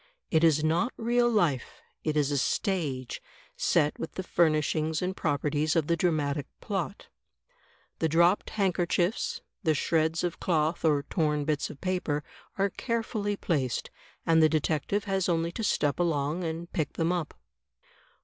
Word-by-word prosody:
It 160 -1 +3
is 155 -2 +4
not 170 +10 +2
real 240 +1 +2
life; 170 - 0 0.2
it 155 -1 0
is 145 -1 +2
a 145 - +1
stage, 140 -8 -1 0.3
set 150 0 +1
with - - -5
the 190 - -4
furnish 155 -4 +2
ings 155 0 0
and 185 +1 -2
properties 150 0 0
of 165 -3 +2
the 170 - +2
dramatic 155 -4 0
plot. 195 -1 -4 0.9
The 160 - +1
dropped 170 +5 +3
handkerchiefs, 180 -1 0 0.2
the 160 -6 +2
shreds 160 +3 +1
of 175 -1 -2
cloth 160 -1 0
or 150 -3 +3
torn 150 -1 0
bits 150 -1 0
of 140 - -11
paper, 180 -6 -1 0.3
are 195 0 +1
carefully 220 -3 -2
placed, 135 - -1 0.3
and 165 -1 +5
the 155 - +6
detective 155 +6 0
has 195 -3 0
only 165 0 +1
to 225 - -5
step 145 -8 +1
along 160 0 0
and 165 +1 -5
pick 155 -3 -1
them 165 +1 0
up. 175 -4 -2
165 Hz, 155 wpm, -28 LUFS, 150-180 Hz, 0.9 s, the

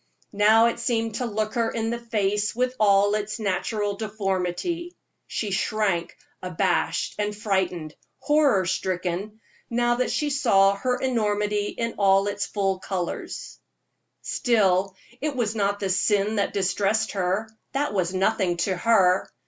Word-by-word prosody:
Now 215 +3 +5
it 235 0 0
seemed 230 -2 -1
to 250 - -2
look 215 0 -2
her 230 -1 +1
in 225 0 -2
the 235 - -3
face 210 -2 -1
with 250 +1 0
all 205 -1 +4
its 210 +1 -2
natural 205 0 -1
deformity. 215 - -3 0.3
She 210 -3 -3
shrunk 195 -3 -1 0.2
abashed 180 0 0
and 210 0 -1
frightened 185 -7 -1 0.2
horror 290 -10 +3
stricken 185 +3 -2 0.3
now 240 0 +1
that 255 - 0
she 295 -1 -1
saw 200 -8 +4
her 250 +5 -1
enormity 210 -4 0
in 230 +1 -3
its 200 +1 +2
full 195 -2 -1
colors. 185 -2 -5 0.6
Still, 195 -5 +1 0.3
it 300 -1 -2
was 230 -4 0
not 200 -2 0
the 195 -2 -1
sin 205 +3 +1
that 200 - +1
distressed 205 +2 0
her; 190 +3 -1 0.3
that 285 -1 -1
was 180 -3 0
nothing 190 -2 +1
to 190 - -1
her. 190 -2 +3
205 Hz, 140 wpm, -25 LUFS, 195-225 Hz, 0.6 s, Now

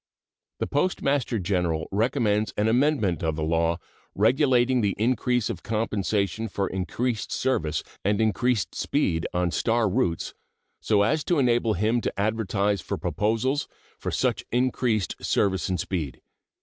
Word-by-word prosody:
The - - -1
Postmaster 140 -6 0
General 90 -4 -1
recommends 105 0 +1
an 105 - +2
amendment 120 - +2
of 80 -2 0
the 75 - -3
law 85 +1 +1 0.4
regulating 125 +2 +3
the 100 -3 +1
increase 125 +1 +1
of - - -4
compensation 105 -1 -1
for 100 -1 -2
increased 110 +5 -2
service 80 -13 0 0.2
and 100 +1 +1
increased 110 +1 +1
speed 85 - 0
on 90 -1 0
star 115 +4 +1
routes, 95 -5 -1 0.5
so 105 -2 +2
as 150 +8 +1
to 175 - +2
enable 120 -4 +2
him 110 +6 +1
to 100 - -3
advertise 105 -2 0
for - - -4
proposals 115 +7 0 0.3
for - - -3
such - - 0
increased 120 -4 0
service 95 -2 +1
and 90 -2 -1
speed. 80 -10 -3
110 Hz, 135 wpm, -25 LUFS, 95-125 Hz, 0.5 s, regulating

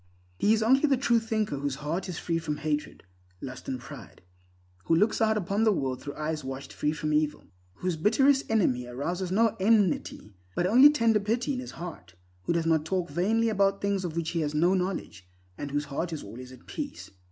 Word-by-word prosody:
He 210 - +3
is 220 0 +3
only 260 +4 +5
the 280 -2 +3
true 235 -2 +3
thinker 220 -8 -2
whose 140 -1 -2
heart 160 +7 -3
is 175 - -5
free 165 -1 -1
from 150 -2 -3
hatred, 150 -1 -3 0.4
lust, 130 +1 -8
and 130 -1 -3
pride; 120 - -12 0.6
who 165 - +3
looks 210 +7 +2
out 220 -1 +3
upon 200 +2 0
the 220 - +5
world 130 -9 -2
through 145 - -7
eyes 155 0 -3
washed 135 +1 -7
free 150 - 0
from 155 0 -2
evil; 150 0 0 0.3
whose 180 - -2
bitterest 265 - +3
enemy 130 - +1
arouses 175 +9 -3
no 225 +3 +3
enmity, 195 - +1 0.2
but 175 - +1
only 250 +9 +8
tender 230 -7 +3
pity 235 +7 -1
in 255 - -3
his 255 - -7
heart; 125 - -8 0.3
who - - +1
does 170 -1 0
not 160 -2 +2
talk 180 +1 -2
vainly 225 +6 +1
about 195 -2 +2
things 200 -1 -1
of 170 -3 -4
which 170 -1 -2
he 170 - -1
has 150 -1 -2
no 175 +5 +3
knowledge, 180 - -3 0.3
and 145 - -5
whose 145 +1 -1
heart 150 +5 -3
is 160 - -5
always 125 +5 -10
at 130 -1 -15
peace. 290 -2 -6
175 Hz, 210 wpm, -28 LUFS, 150-220 Hz, 0.6 s, only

